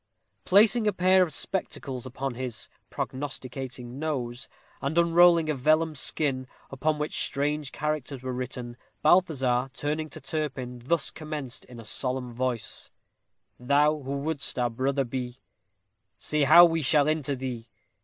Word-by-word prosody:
Placing 215 +3 +5
a 210 - +2
pair 185 +1 +4
of 175 -3 +2
spectacles 135 -10 -3
upon 135 +1 -4
his 120 -4 -6 0.2
"prognosticating 130 -2 -5
nose," 130 -5 -3 0.3
and 140 +4 -2
unrolling 170 -1 +5
a 155 - +1
vellum 155 +4 +2
skin, 130 0 +1 0.2
upon 150 +3 0
which 150 0 -1
strange 145 0 -1
characters 150 -3 -3
were 130 -1 -3
written, 125 -1 -5 0.3
Balthazar, 135 -7 +3
turning 155 +2 -2
to - - -9
Turpin, 135 -5 -4
thus 165 +4 0
commenced 150 -5 -6
in 120 -2 -12
a 115 - -10
solemn 125 +2 -2
voice: 125 -1 -3 0.7
Thou 145 +4 +3
who 140 +1 -3
wouldst 145 -1 -3
our 120 -1 +1
brother 135 +4 0
be, 125 0 -5 0.8
Say 150 -1 0
how 170 +5 +9
we 165 -1 +1
shall 145 +1 +3
enter 155 -3 0
thee? 125 -3 -5
140 Hz, 140 wpm, -27 LUFS, 125-155 Hz, 0.8 s, how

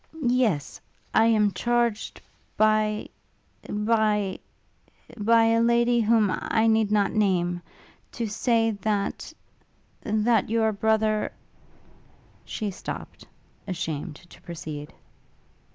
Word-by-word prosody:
'Yes; 240 - 0 0.3
I 220 - +5
am 210 -3 +3
charged 235 -1 -1 0.4
by... 215 0 +2 0.6
by... 210 -2 +1 0.8
by 230 +1 +4
a 225 0 +3
lady 235 +1 +3
whom 220 -3 +3
I 220 0 0
need 220 -2 +3
not 205 -1 +2
name 175 -4 +1 0.5
to 235 - -3
say 225 +1 +1
that... 205 -1 -2 0.7
that 215 0 +1
your 220 -1 +2
brother 215 0 +1 0.6
' - - -31
She 210 -3 -2
stopt, 185 - -8 0.4
ashamed 160 -4 -4
to 175 +3 -17
proceed. 155 -3 -7
215 Hz, 100 wpm, -25 LUFS, 200-230 Hz, 0.8 s, I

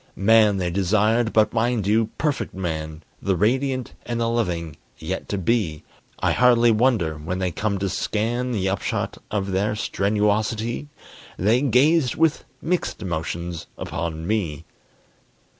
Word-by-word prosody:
Man 105 0 +4
they 90 -2 -1
desired, 110 +5 +2
but 110 -1 +3
mind 115 -2 +1
you, 110 +2 +3
Perfect 150 -9 -1
Man, 80 -3 -4 0.2
The 95 -1 +1
radiant 130 +6 0
and 120 -1 -3
the 115 - +1
loving, 90 -10 -2 0.2
yet 90 +4 -5
to 100 - -1
be! 95 -6 0 0.3
I - - +1
hardly 120 -1 +5
wonder, 105 -9 +1
when 85 +5 -3
they 95 -1 -1
come 100 +3 -1
to 100 +1 -1
scan 115 +6 -1
The 100 -5 0
upshot 95 0 -2
of 100 -2 -2
their 100 +3 0
strenuosity, 110 +5 0 0.5
They 110 +7 +3
gazed 140 +1 +3
with 160 -1 +1 0.2
mixed 175 -8 -1
emotions 85 -1 -4
upon 80 -1 -4
me. 85 -7 -2
105 Hz, 140 wpm, -23 LUFS, 90-120 Hz, 0.5 s, hardly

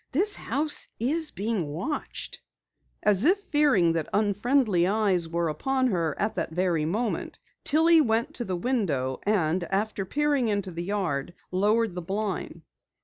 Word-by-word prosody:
This 395 +9 +3
house 295 +5 0
is 305 +7 +1
being 205 -5 -2
watched!" 175 - -5 0.6
As 205 -1 +4
if 360 +7 +5
fearing 290 - +2
that 165 -2 -2
unfriendly 205 -2 +2
eyes 195 -5 +1
were 170 0 -1
upon 260 - 0
her 165 -7 -1
at 215 +1 0
that - - -2
very 170 -2 0
moment, 215 +8 -2 0.3
Tillie 325 +2 +5
went 235 +3 0
to 240 - -3
the 185 -5 -3
window 170 - -1
and 180 -4 +1
after 200 +2 -1
peering 285 +3 0
into 200 -3 -1
the 170 0 -5
yard, 175 -6 -2 0.2
lowered 210 +3 +2
the 180 - -5
blind. 190 -3 -4
205 Hz, 145 wpm, -26 LUFS, 175-255 Hz, 0.6 s, if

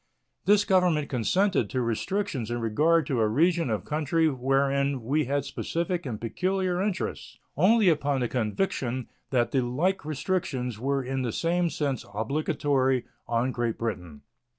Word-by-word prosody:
This 205 0 +4
Government 180 -6 +2
consented 145 - +1
to 130 - -2
restrictions 125 - -2
in 120 0 -2
regard 150 +9 +2
to 130 -3 -1
a 110 - +3
region 165 +6 +2
of 110 -2 -2
country 155 +2 +1
wherein 135 0 +1
we 145 +5 +1
had 140 +1 -1
specific 170 +2 -2
and 110 -4 -4
peculiar 185 - -1
interests 195 -2 -3 0.2
only 205 - +4
upon 145 -5 +2
the 120 - +1
conviction 125 - -2 0.2
that 120 -3 +1
the 135 - +2
like 150 +11 0
restrictions 145 - -2
were 135 +2 0
in 130 +1 -2
the 120 -3 -1
same 170 +4 +1
sense 140 -6 -2
obligatory 135 0 0 0.2
on 120 +2 +1
Great 120 -2 -2
Britain. 90 -10 -5
140 Hz, 150 wpm, -27 LUFS, 120-170 Hz, 0.2 s, This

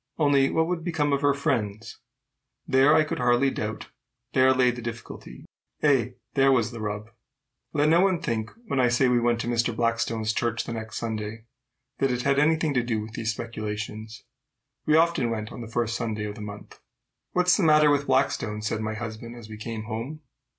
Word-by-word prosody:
Only, 140 -3 +3
what 160 - +2
would 170 -1 -2
become 155 -4 0
of 140 - +1
her 140 -2 +3
friends? 110 -6 -2 0.7
There, 135 +3 +5
I 155 - +5
could 155 - -4
hardly 125 +2 +3
doubt, 110 -2 -5 0.4
there 130 0 +5
lay 130 -1 +4
the 120 0 -7
difficulty! 115 - -8 0.4
Ay, 125 -5 +2 0.2
there 135 0 +4
was 120 -3 +2
the 115 -2 -7
rub! 105 +1 -4 0.6
Let 150 0 +2
no 170 +2 +5
one 190 -3 +2
think, 115 -8 -2 0.2
when 140 -11 -1
I 125 - +4
say 120 +2 +3
we 125 -1 +3
went 120 0 +1
to - - -4
Mr. 120 -1 0
Blackstone's 115 -1 0
church 115 0 -1
the - - -5
next 110 -1 -6
Sunday, 110 -1 -4 0.5
that 135 - +2
it 125 -1 -1
had 140 +1 +2
any 155 +2 +4
thing 155 -2 -1
to 125 -2 +1
do 115 -2 -1
with 110 +1 -7
these 115 0 -1
speculations. 110 0 -6 0.6
We 155 - +4
often 165 -7 +3
went 110 -1 -4
on - - -8
the 115 - -7
first 115 -1 -1
Sunday 110 -3 -3
of 105 - -4
the 105 - -10
month. 105 -1 -9 0.5
"What's 180 0 +4
the - - 0
matter 150 -3 +5
with 145 0 +1
Blackstone?" 130 -5 0
said 110 0 -2
my 110 0 -3
husband 115 +1 -7
as 115 -2 -11
we 110 - -7
came 110 0 -5
home. 115 +8 -5
120 Hz, 200 wpm, -26 LUFS, 110-140 Hz, 0.7 s, There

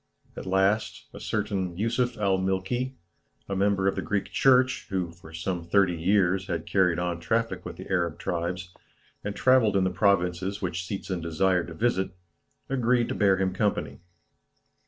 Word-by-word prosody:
At - - -7
last, 95 +3 +1
a - - -9
certain 100 -5 -2
Yusuf 120 +3 0
al 100 -3 +1
Milky, 95 +8 -1 0.5
a 100 - -2
member 95 0 +2
of 95 - +2
the - - -2
Greek 100 -1 -2
church, 130 -1 +3
who, 90 -3 -2
for 85 -1 -15
some 85 +1 -3
thirty 90 +1 +3
years, 95 +1 +2
had 85 -4 -3
carried 90 -3 +2
on 90 -1 -2
traffic 95 +1 -1
with - - -6
the - - -9
Arab 85 -5 0
tribes, 90 +1 -3 0.5
and 100 0 -4
travelled 125 -6 +4
in 95 - +3
the 95 - +1
provinces 95 0 +1
which 90 -1 -2
Seetzen 95 -3 -4
desired 85 +2 +1
to 85 - -8
visit, 100 -2 +1 0.6
agreed 125 -2 +1
to - - -1
bear 100 -2 +3
him 95 -1 0
company. 85 -8 -1
95 Hz, 165 wpm, -27 LUFS, 90-105 Hz, 0.6 s, travelled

